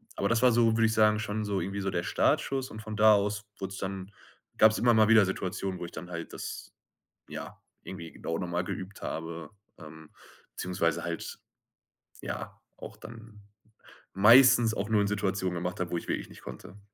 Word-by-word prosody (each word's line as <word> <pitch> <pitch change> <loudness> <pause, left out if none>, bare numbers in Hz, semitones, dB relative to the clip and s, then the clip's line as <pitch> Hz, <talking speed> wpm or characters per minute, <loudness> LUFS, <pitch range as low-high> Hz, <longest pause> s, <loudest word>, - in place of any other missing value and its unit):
aber 100 - -1
das 115 +1 +3
war 125 - +6
so, 115 -1 +3
würde 115 - +4
ich 110 - 0
sagen, 110 -1 +4
schon 110 0 -3
so 100 -2 -1
irgendwie 100 +3 -4
so 95 - -1
der 85 -1 -2
Startschuss 130 +9 0
und 110 - -8
von 110 0 -7
da 110 +1 +7
aus 105 +1 -1
wurd's 95 -1 -5
dann 95 0 -5 0.5
gab's 110 0 +6
immer 120 0 +4
mal 110 -1 +5
wieder 110 -3 +7
Situationen, 95 0 -3
wo - - -5
ich 85 - -10
dann 90 +3 -9
halt 85 -1 -6
das, - - -7 0.6
ja, - - -8 0.2
irgendwie 85 -3 -8
genau 80 - -4
noch 90 - -3
mal 85 +1 -1
geübt 95 +2 -7
habe 80 -1 -6 0.3
ähm, 80 -1 -12 0.4
beziehungsweise 90 -3 -1
halt, - - -5 0.9
ja, - - -6 0.2
auch - - -9
dann 110 -2 -13 0.7
meistens 120 +2 +7
auch 105 0 -3
nur 110 -2 +3
in 100 - +1
Situationen 95 -3 -1
gemacht 90 +4 -4
habe, 90 -1 -3
wo 85 - 0
ich - - -7
wirklich - - -3
nicht - - -14
konnte. 100 - -10
100 Hz, 190 wpm, -29 LUFS, 90-110 Hz, 0.9 s, da